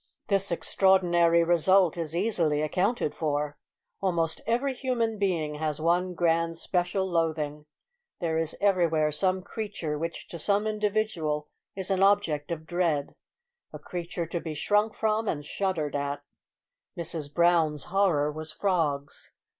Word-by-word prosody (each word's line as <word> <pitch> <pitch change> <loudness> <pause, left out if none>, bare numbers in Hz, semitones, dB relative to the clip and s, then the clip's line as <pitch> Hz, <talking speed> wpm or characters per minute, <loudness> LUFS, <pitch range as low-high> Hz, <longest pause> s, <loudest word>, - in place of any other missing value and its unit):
This 195 -1 +2
extraordinary 175 -2 +3
result 175 +1 +4
is 165 -2 -4
easily 170 -7 +1
accounted 185 +4 0
for. 150 -1 -2 0.4
Almost 165 -4 0
every 250 +4 +1
human 235 -4 -1
being 170 -7 0
has 155 -1 -2
one 175 +3 +1
grand 165 -1 +1
special 180 +2 0
loathing. 155 -3 -1 0.5
There 160 -2 0
is 160 -1 -2
everywhere 170 -6 +2
some 185 +4 0
creature 200 -8 -4
which 165 +1 -5
to 170 - -7
some 205 +5 +1
individual 210 -8 -1 0.3
is 190 0 -3
an 190 0 +1
object 195 -7 +2
of 160 -1 -4
dread 165 -5 0 0.6
a - - -7
creature 175 -1 -5
to 170 +1 -3
be 160 -2 -6
shrunk 210 +7 +1
from 220 0 0
and 145 -5 -2
shuddered 165 -4 -2
at. 145 0 -2 0.7
Mrs 165 -3 -4
Brown's 165 -3 +2
horror 165 -7 +3
was 155 +1 -6
frogs. 155 -7 -1
170 Hz, 135 wpm, -27 LUFS, 155-195 Hz, 0.7 s, result